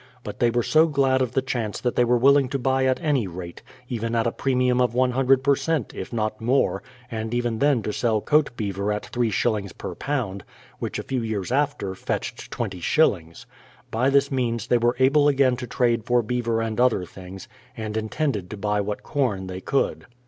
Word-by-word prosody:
But - - -7
they 120 - +4
were 120 0 0
so 155 +6 +4
glad 135 -3 +2
of 125 -2 -1
the 135 - +1
chance 120 -5 -3
that 125 - -1
they 125 - +4
were 120 0 +3
willing 135 +1 +4
to 140 - -1
buy 130 0 +1
at 130 0 +1
any 140 -9 +1
rate, 85 -1 -8 0.2
— - - -24
even 115 -1 -3
at 115 - +1
a 115 - +1
pre 135 +2 -1
mium 125 0 +2
of 125 -1 +1
loo 130 +1 +3
per 140 +2 +2
cent, 160 -4 -2
if 95 - -7
not 110 -2 -2
more, 125 +4 +1 0.3
and 110 +1 -3
even 120 -2 -1
then 140 -6 +2
to 105 - -3
sell 115 -3 +1
coat 150 +6 +2
beaver 100 -1 -2
at 105 0 -3
three 120 -2 -1
shillings 105 -2 -1
per - - -6
pound, 120 -9 -3 0.4
which - - -3
a - - -4
few 130 -2 -2
years 110 -3 -3
after 135 -8 0
fetched 95 - -4
twenty 100 -6 -4
shillings. 85 - +1 0.5
By 125 +4 +2
this 140 0 +3
means 120 -4 -1
they 120 0 +2
were 120 +1 +2
able 140 +3 +4
again 135 -3 +3
to 125 -1 -6
trade 120 -2 +1
for 120 -1 +2
beaver 115 0 -1
and 115 0 -3
other 125 -7 +2
things, 95 +2 -11 0.3
and 110 -1 -4
intended 110 - -2
to 105 - -7
buy 105 0 0
what 105 +1 -4
corn 120 -10 -1
they 95 0 -6
could. 135 - -1
120 Hz, 215 wpm, -24 LUFS, 105-130 Hz, 0.5 s, they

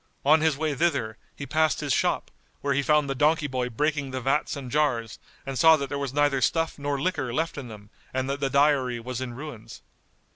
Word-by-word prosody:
On 155 +2 +5
his 155 -3 +2
way 155 0 -1
thither, 130 -8 0 0.2
he 140 - -6
passed 155 +1 +1
his 145 -3 0
shop, - - 0 0.3
where 140 0 0
he 140 - +2
found 150 0 +2
the 135 - -1
donkey 150 +3 +2
boy 130 -3 -2
breaking 145 +3 -1
the 130 0 -3
vats 135 +5 0
and 130 -3 -7
jars 120 -7 0 0.3
and 135 -1 -4
saw 160 -1 +7
that 140 -2 -4
there 140 - -3
was 140 -2 -3
neither 145 -1 +2
stuff 165 +3 0
nor 145 -1 -2
liquor 145 -5 -1
left 160 +7 -1
in 140 -3 -6
them 105 -2 -12 0.2
and 130 0 -2
that 140 +1 -2
the 140 -1 0
dyery 140 -3 +2
was 125 +1 -5
in 120 -2 -5
ruins. 135 -5 -9
140 Hz, 220 wpm, -26 LUFS, 130-150 Hz, 0.3 s, saw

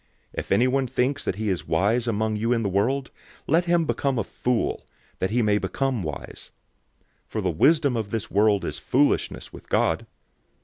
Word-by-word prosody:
If - - -5
anyone 130 +2 +3
thinks 130 +3 0
that - - -1
he 110 +1 -2
is 95 -3 -2
wise 105 +9 +1
among 110 -1 0
you 115 +3 0
in 115 -1 0
this 100 - -1
world, 130 +7 0 0.3
let 165 +4 +2
him 170 -1 +2
become 140 -3 0
a 115 - +1
fool, 120 +4 -2 0.3
that 95 - 0
he 120 +3 +1
may 105 -1 +3
become 135 -2 -1
wise. 75 -4 -7 0.8
003:019 - - -44
For - - -3
the - - 0
wisdom 140 - +3
of 110 -3 -2
this 115 -2 -4
world 105 0 +3
is - - -4
foolishness 140 +3 0
with - - -13
God. - - +1
115 Hz, 185 wpm, -25 LUFS, 105-135 Hz, 0.8 s, anyone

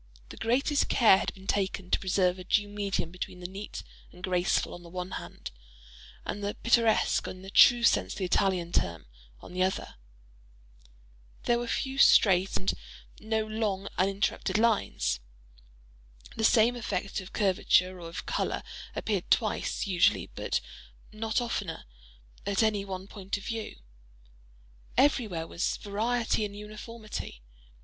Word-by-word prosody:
The - - -10
greatest 270 +6 +1
care 215 -5 +6
had - - -2
been 190 0 -14
taken 190 -2 -1
to - - +3
preserve 185 -1 +1
a - - -7
due 205 +3 +2
medium 200 -4 -2
between 180 0 -6
the 180 - -9
neat 195 +3 -7 0.3
and 180 - -15
graceful 180 -1 +1
on 175 - -9
the 170 - -12
one 180 +1 -5
hand, - - -7 0.7
and 205 - -4
the 205 +1 -2
pittoresque, 230 -2 +3
in 185 0 -8
the 195 - -9
true 240 +3 +7
sense - - +3
of - - -9
the 195 - -1
Italian 180 -2 +1
term, 85 - 0 0.4
on - - -11
the 185 - -2
other. 185 - -1 1.5
There 240 0 +2
were 240 - -4
few 265 +3 -2
straight, 190 -7 +5
and 190 - 0 0.5
no 220 0 -1
long 215 -3 -2
uninterrupted 195 0 0
lines. 210 - +1 1.2
The 220 - -3
same 230 +2 +5
effect 200 -5 -3
of 185 - -11
curvature 185 -2 +2
or 170 -1 -7
of 165 - -6
color - - -1 0.3
appeared 200 -5 -2
twice, 215 -3 +1
usually, 185 -2 +2
but - - -1 0.5
not 220 +1 -1
oftener, 205 -8 -3 0.6
at 200 +2 +1
any 210 -2 +1
one 190 -1 -6
point 200 0 -5
of 200 - -10
view. 225 -1 -4 1.2
Everywhere 230 - +2
was 170 +2 -2
variety 225 +2 0
in 205 -1 -4
uniformity. 210 - -8
200 Hz, 145 wpm, -29 LUFS, 185-220 Hz, 1.5 s, true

